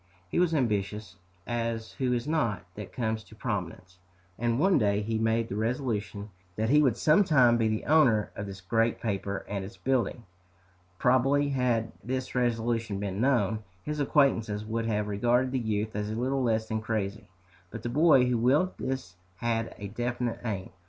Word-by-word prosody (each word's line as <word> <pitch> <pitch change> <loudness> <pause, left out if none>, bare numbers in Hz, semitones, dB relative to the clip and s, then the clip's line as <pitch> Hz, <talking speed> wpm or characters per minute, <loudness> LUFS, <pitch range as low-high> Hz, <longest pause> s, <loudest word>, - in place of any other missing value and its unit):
He - - 0
was 175 -2 +2
ambitious, 105 - -1 0.3
as 115 -1 -2
who 130 -2 -1
is 120 +2 -1
not, 115 - 0
that 105 0 -8
comes 110 -2 -2
to 110 - -16
prominence; 95 -5 -5 0.4
and 120 0 +1
one 185 +5 +4
day 100 -2 +2
he 110 +1 -1
made 115 +1 +1
the 100 - -5
resolution 110 -3 -2 0.2
that 110 +3 0
he 150 +1 +6
would 130 -6 +2
sometime 150 - +5
be 115 -1 +2
the 110 0 -2
owner 130 -9 +4
of 100 - -5
this 95 -1 -8
great 115 +5 +1
paper 100 -2 -3
and 100 -1 -3
its 95 - -9
building! 125 -2 0 0.7
Probably 135 +5 +3
had 125 -4 0
this 130 +1 -3
resolution 115 -4 0
been 100 0 -3
known, 110 -5 +2 0.2
his 150 0 -3
acquaintances 115 -8 +2
would 115 +1 -2
have 105 -2 0
regarded 120 +5 +1
the 130 - 0
youth 110 -2 -2
as 105 0 -2
little 130 +5 -1
less 110 -3 +1
than 110 -1 -2
crazy. 105 -1 -3 0.4
But - - -8
the 120 - -2
boy 145 -1 +5
who 125 -2 +1
willed 145 +10 +2
this 130 -9 -4 0.2
had 115 +2 -2
a 100 - -6
definite 120 +2 -2
aim. 100 -6 -4
115 Hz, 170 wpm, -28 LUFS, 105-125 Hz, 0.7 s, he